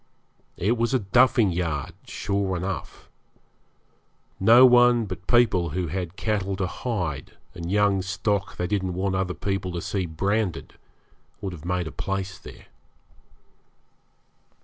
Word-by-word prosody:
It 110 +7 +1
was 120 +3 +1
a - - +3
'duffing 115 +1 +3
yard' 80 -5 -2
sure 100 -2 -2
enough. 95 +1 -5 1.3
No 115 +6 +8
one 120 -2 +5
but 90 -1 -8
people 115 -8 +3
who 90 -3 -1
had 90 +1 -4
cattle 100 -3 -1
to 95 0 -1
hide 90 - -4 0.2
and 85 0 -6
young 100 -1 +3
stock 100 +1 -2
they 90 - -1
didn't 95 -2 -1
want 95 +1 -1
other 95 -1 -1
people 95 -2 -2
to 85 - -3
see 95 -1 -2
branded 95 +4 -2 0.7
would 100 -3 -5
have 80 -2 -10
made 90 0 -1
a 80 - -6
place 95 0 -4
there. - - -13
95 Hz, 135 wpm, -25 LUFS, 90-105 Hz, 1.3 s, No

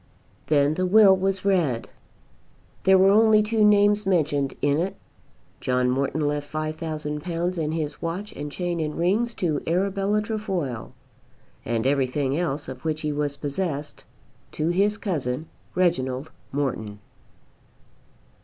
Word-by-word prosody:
Then 145 -1 +3
the 185 +3 0
will 200 0 +7
was 190 0 -1
read. 165 -12 +1 1.0
There 190 0 +7
were 190 +1 +6
only 215 0 +5
two 215 0 +1
names 205 0 +5
mentioned 150 -7 +1
in 145 +1 +2
it. 185 +3 -2 0.6
John 125 0 +1
Morton 140 +3 0
left 145 0 -3
£5,000 155 +2 -3
and 155 -1 -1
his 155 -3 -4
watch 180 +5 -4
and 145 0 -6
chain 175 +1 -2
and 150 -1 -3
rings 215 +8 +1
to 155 -5 -1
Arabella 195 +4 +1
Trefoil, 190 - -3 0.7
and 115 0 -1
everything 135 0 +1
else 150 -3 -2
of 130 -1 -8
which 155 -1 -2
he 150 - -1
was 145 -1 -2
possessed 145 0 -3 0.5
to 155 +2 -1
his 200 +4 +2
cousin 155 - -3 0.3
Reginald 140 -5 0 0.2
Morton. 120 -7 -2
160 Hz, 130 wpm, -24 LUFS, 145-190 Hz, 1.0 s, will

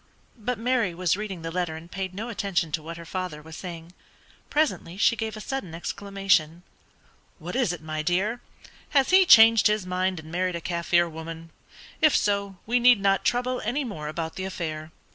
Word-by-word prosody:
But 245 +3 -2
Mary 230 -6 0
was 180 -1 +1
reading 195 -4 -6
the 165 - -4
letter 175 -2 -2
and 165 +2 -11
paid 190 -1 -4
no 225 +4 -5
attention 195 -7 -1
to 155 - -2
what 165 +2 -8
her 170 - -9
father 180 -3 -4
was 160 +1 -11
saying. 170 -1 -8 0.6
Presently 295 - 0
she 230 - +4
gave 220 -1 -4
a - - -6
sudden 210 - -5
exclamation. 180 -3 0 0.7
"What 175 +3 -7
is 250 -8 +2
it, 175 -3 -7
my 155 0 -3
dear; 190 +9 0 0.6
has 270 +3 +3
he 375 0 +6
changed 225 - +8
his 210 -2 0
mind 185 0 -1
and 160 0 -11
married 180 +1 -1
a - - -3
Kaffir 170 0 +1
woman? 165 0 -8 0.5
If 310 - +5
so, 200 -2 0
we 245 +3 +2
need 245 -2 +6
not 195 0 +2
trouble 250 +1 0
any 245 +7 -1
more 160 - -6
about 160 +2 -4
the 190 - -3
affair." 160 -4 -5
185 Hz, 190 wpm, -26 LUFS, 165-220 Hz, 0.7 s, changed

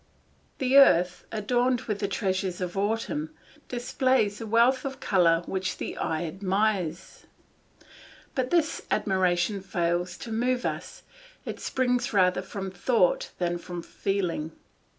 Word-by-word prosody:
The 265 +1 +3
earth 180 -9 +4
adorned 245 +3 +1
with 210 -5 -3
the 200 - 0
treasures 190 -2 -1
of 180 0 -4
autumn 225 +10 -2 0.3
displays 245 -3 0
a 225 - -5
wealth 235 +4 +4
of 270 -1 -5
colour 170 -3 +3
which 190 -1 -3
the - - -5
eye 160 +1 -2
admires; 190 -1 -2 1.1
but 255 -1 -1
this 330 -2 +1
admiration 190 -1 +1
fails 175 -1 -1
to 230 - -8
move 245 +3 0
us, - - -4 0.4
it - - -5
springs 250 -2 0
rather 185 -2 +3
from 190 0 -6
thought 190 0 +1
than 175 -1 -1
from 175 0 -7
feeling. 175 -6 -2
200 Hz, 130 wpm, -27 LUFS, 180-245 Hz, 1.1 s, earth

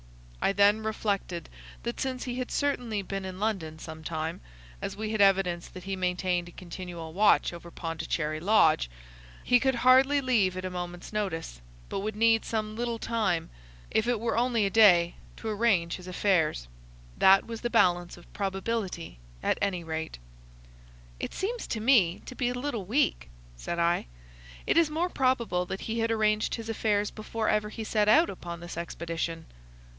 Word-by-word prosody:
I - - +4
then 205 +2 +4
reflected 200 -5 -2 0.4
that 235 0 -4
since 260 -1 -2
he 250 0 -4
had 255 - -3
certainly 245 -8 -1
been 195 0 -4
in 185 0 -6
London 190 -8 -2
some 160 0 -9
time—as - - -6
we 215 0 -3
had 215 -2 +1
evidence 190 -3 +3
that 185 - -11
he 195 0 -3
maintained 180 -1 -1
a - - -13
continual 175 -2 -8
watch 205 -1 +4
over 170 0 -9
Pondicherry 160 -2 -3
Lodge—he - - +1
could 265 0 +1
hardly 260 +4 +5
leave 220 -9 +2
at 185 - -4
a 185 - -3
moment's 175 +1 -6
notice, 165 - -3 0.3
but - - -2
would 210 +2 -3
need 225 0 +4
some 215 -1 -3
little 235 0 -2
time, 215 -8 -1 0.4
if 220 +1 +1
it 245 -2 +1
were 230 +1 -1
only 235 -2 +2
a 195 - 0
day, 180 -6 +6 0.2
to 225 - -7
arrange 205 -6 +1
his 180 -1 -12
affairs. 175 - +1 0.5
That 195 0 +6
was 230 -1 -7
the 240 - -1
balance 175 -5 +2
of 175 - -17
probability, 195 - -3 0.2
at - - +1
any 190 -4 0
rate." 160 0 -4 1.0
"It - - -5
seems 460 +5 -3
to 220 - -2
me 215 -7 +3
to - - -8
be 245 -1 0
a 245 - -3
little 245 -6 -3
weak," 185 - +1 0.3
said - - -4
I. 170 - +1 0.6
"It - - +2
is 335 -2 +5
more 330 +4 0
probable 235 - +1
that 190 - -5
he 230 +1 -3
had 225 0 +1
arranged 215 -1 +1
his 230 -1 -7
affairs 210 -2 0
before 220 +1 -4
ever 210 0 +1
he 220 - -6
set 210 -1 +1
out 325 +9 +5
upon 170 -2 -7
his 175 - -7
expedition." 165 -1 -4
195 Hz, 170 wpm, -28 LUFS, 170-225 Hz, 1.0 s, day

